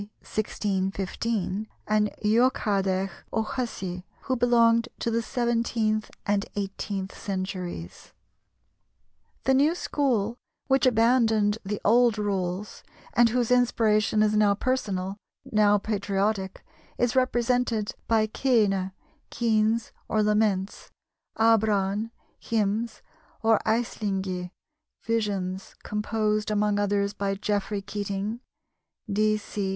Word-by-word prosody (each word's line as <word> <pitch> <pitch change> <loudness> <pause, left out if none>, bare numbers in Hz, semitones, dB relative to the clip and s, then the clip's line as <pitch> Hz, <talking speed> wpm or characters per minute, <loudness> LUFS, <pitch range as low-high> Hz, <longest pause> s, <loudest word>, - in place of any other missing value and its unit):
1615), 205 0 -2 0.2
and 210 0 +2 0.2
Eochaidh 200 -5 +2 0.2
O'Hussey, 215 -6 -3 0.2
who 260 - -1
belonged 235 -1 +4
to 230 - -2
the 230 +1 +1
seventeenth 230 -3 0 0.2
and 205 0 0
eighteenth 195 -1 -4
centuries. 185 - -5 1.3
The 265 - +3
new 290 +5 +4
school, 240 - 0 0.3
which 270 -2 +3
abandoned 225 -3 +3
the 205 +1 -3
old 235 +1 +5
rules 195 -1 -2 0.3
and 240 -1 +5
whose 245 0 0
inspiration 220 -3 +3
is 215 0 +2
now 210 -1 +4
personal, 200 -6 -2 0.3
now 210 -1 +4
patriotic, 200 -1 -1 0.3
is 245 -1 +1
represented 245 -3 +1
by 220 -1 +3
caoine 210 -5 +1 0.4
(keens 225 -1 +1 0.2
or 215 -1 +2
laments), 210 -2 0 0.5
abran 215 -2 +2 0.3
(hymns), 220 +1 -1 0.4
or 225 -1 +4
aislingi 195 -5 -1 0.5
(visions), 195 -4 -2
composed, 210 0 -1
among 210 -1 +1
others, 200 0 +1
by 200 -1 -1
Geoffrey 205 0 -2
Keating 205 +2 -3 0.7
(d. 215 +1 +2
c. 205 -1 -4
210 Hz, 95 wpm, -26 LUFS, 200-230 Hz, 1.3 s, old